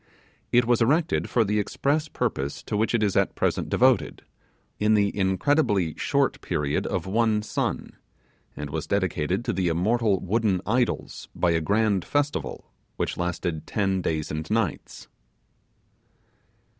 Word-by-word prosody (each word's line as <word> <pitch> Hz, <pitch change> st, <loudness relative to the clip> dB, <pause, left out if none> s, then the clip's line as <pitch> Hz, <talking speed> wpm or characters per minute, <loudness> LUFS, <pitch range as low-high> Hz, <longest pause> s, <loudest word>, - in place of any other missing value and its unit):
It 120 Hz, 0 st, +4 dB
was 120 Hz, 0 st, +2 dB
erected 155 Hz, +8 st, +2 dB
for 120 Hz, -, +3 dB
the 105 Hz, 0 st, 0 dB
express 145 Hz, +9 st, 0 dB
purpose 70 Hz, -, -3 dB
to -, -, -4 dB
which 110 Hz, +3 st, +1 dB
it 110 Hz, -, +1 dB
is 100 Hz, -2 st, +1 dB
at 100 Hz, -1 st, +2 dB
present -, -, -1 dB
devoted, -, -, +2 dB, 0.6 s
in 105 Hz, +1 st, +3 dB
the 100 Hz, -1 st, +1 dB
incredibly 100 Hz, -, +1 dB
short 140 Hz, -1 st, 0 dB
period 75 Hz, -4 st, -1 dB
of -, -, -2 dB
one 105 Hz, +1 st, +1 dB
sun; -, -, -2 dB, 0.7 s
and 75 Hz, -1 st, -5 dB
was 80 Hz, +1 st, -3 dB
dedicated 95 Hz, +1 st, -1 dB
to -, -, 0 dB
the 95 Hz, -1 st, 0 dB
immortal 100 Hz, +4 st, +1 dB
wooden 100 Hz, 0 st, +1 dB
idols 120 Hz, +3 st, -1 dB
by 85 Hz, -, +2 dB
a 80 Hz, -1 st, +1 dB
grand 100 Hz, +2 st, +1 dB
festival, 145 Hz, -, -2 dB, 0.3 s
which -, -, -2 dB
lasted 90 Hz, -2 st, -3 dB
ten 95 Hz, -2 st, 0 dB
days 80 Hz, -3 st, -2 dB
and 80 Hz, +1 st, -4 dB
nights. 110 Hz, -1 st, -2 dB
100 Hz, 145 wpm, -25 LUFS, 90-115 Hz, 0.7 s, It